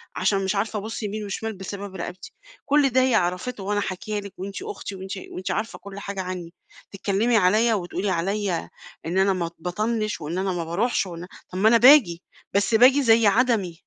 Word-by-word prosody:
عشان 195 -1 +1
مش 190 +1 -1
عارفة 210 +1 -1
ابُصّ 220 +2 -6
يمين 210 +1 -4
وشمال 220 +2 -4
بسبب 195 0 -7
رقبتي، 180 +1 -7 0.3
كلّ 285 -1 +3
ده 260 +1 +3
هي 255 -3 +3
عرفته 180 +4 -1
وأنا 205 +1 0
حاكية 205 +3 -4
لِك 200 -1 -9
وأنتِ 195 - -6
أختي 410 - -6
وأنتِ 190 +1 -6
وأنتِ 185 - -4
عارفة 220 +1 -3
كلّ 200 0 -9
حاجة 200 -1 -4
عني، 180 -2 -6 0.4
تتكلّمي 205 +4 +1
عليَّ 215 +5 +3
وتقولي 190 +1 -2
عليَّ 190 +1 -1 0.4
إن 175 +3 -2
أنا 195 0 +4
ما 170 -2 -3
باطنّش 215 +3 -2
وإن 160 +4 -4
أنا 190 0 0
ما 170 -1 -2
باروحش 195 +7 0
وإن 175 0 -8 0.2
طب 185 - -7
ما 220 +2 +5
أنا 235 - +6
باجي، 235 - +6 0.3
بس 200 +3 +2
باجي 260 +4 +6
زي 225 -2 +5
عدمي. 215 -5 +2
200 Hz, 190 wpm, -24 LUFS, 185-225 Hz, 0.4 s, أنا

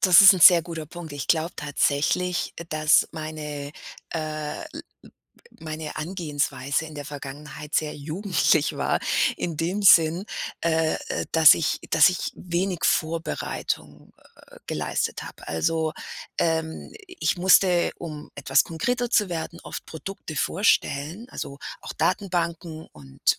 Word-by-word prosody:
Das 185 0 +8
ist 195 +1 +11
'n 185 - -3
sehr 170 -1 +9
guter 165 -2 -7
Punkt. 170 -2 -9
Ich 145 -2 -5
glaube 165 +1 +1
tatsächlich, 150 +4 0
äh, 170 - -7
dass 155 -1 +3
meine, 150 -2 -6 0.4
äh, 155 -1 -4
l - - -7
l - - -7 0.8
meine 155 -1 -6
Herangehensweise 155 -4 -2
in 155 -1 -11
der 145 - -6
Vergangenheit 145 +1 -6
sehr 155 -1 -1
jugendlich 160 0 +1
war - - 0 0.4
in 165 -3 -3
dem 180 +6 -1
Sinn, 170 -1 +6 0.4
äh, 160 -1 +1
äh, - - -2
dass 160 -2 +8
ich 160 - -1
dass - - +7
ich 185 - -3
wenig 180 0 -2
Vorbereitung, 155 - -2 0.4
äh, - - -15
geleistet - - -2
habe. - - -11
Also, 155 - 0 0.5
ähm, 160 -1 -1 0.2
i 365 - -12
ich - - +2
musste, 180 -1 +4
um 155 -3 -8
etwas 145 - +3
konkreter 245 +9 -2
zu 210 -5 +3
werden, 170 0 -5
oft - - -7
Produkte 160 0 -8
vorstellen, 175 - 0
also, 140 0 -6 0.2
auch - - -7
Datenbanken 170 -4 -2
und 70 -2 -1
160 Hz, 140 wpm, -25 LUFS, 150-175 Hz, 0.8 s, ist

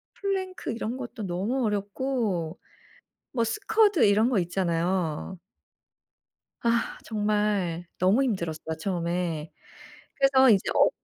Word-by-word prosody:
플랭크 380 -5 -3
이런 235 +1 -3
것도 240 -3 -7
너무 200 +8 -1
어렵고 205 -4 -1 0.8
뭐 235 -3 +1
스쿼드 415 - +3
이런 210 +3 +4
거 240 - +2
있잖아요. 175 -1 -1 1.2
아. 235 0 0
정말 210 -5 0
너무 195 +9 +3
힘들었어요 170 -9 -3
처음에. 170 -3 -2 0.6
그래서 270 -1 +5
이제 200 -4 +4
어 - - +6
205 Hz, 230 characters per minute, -27 LUFS, 175-245 Hz, 1.2 s, 어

